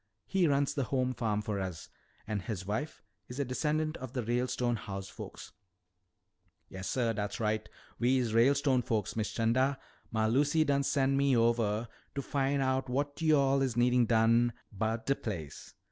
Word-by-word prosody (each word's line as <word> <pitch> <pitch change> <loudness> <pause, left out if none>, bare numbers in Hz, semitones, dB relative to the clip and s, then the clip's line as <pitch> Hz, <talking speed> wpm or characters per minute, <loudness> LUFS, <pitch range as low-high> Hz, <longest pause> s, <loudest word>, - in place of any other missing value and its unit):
He 190 -3 +2
runs 140 0 +2
the 140 -3 -1
home 130 0 0
farm 110 -3 -1
for 105 -2 -2
us. 90 -5 -5 0.4
And 105 -2 -2
his 95 -2 -5
wife 120 +10 -4 0.2
is 125 +3 -7
a 140 - +1
descendant 155 +5 -1
of 130 -1 -8
the 125 -3 -2
Ralestone 120 +1 0
house 95 -2 -6
folks." - - -9 1.2
"Yassuh, 115 +5 -1
dat's 105 -1 -3
right. 110 -1 -1 0.3
We's 125 -2 +2
Ralestone 130 +2 +4
folks, 105 -3 -2
Miss 110 -1 -1
'Chanda. 130 +4 +1 0.3
Mah 110 -1 0
Lucy 145 +7 +3
done 140 -2 +2
sen' 135 -1 +1
me 140 -2 +3
ovah 115 -1 +2 0.3
to 140 - -1
fin' 140 0 0
out 130 -1 0
what 145 +4 -2
yo'all 140 -4 +4
is 130 -4 0
a - - -7
needin' 125 0 +4
done 115 +1 +4 0.2
'bout 110 +3 -1
de 140 - +3
place. 85 - -7
125 Hz, 165 wpm, -31 LUFS, 110-140 Hz, 1.2 s, Ralestone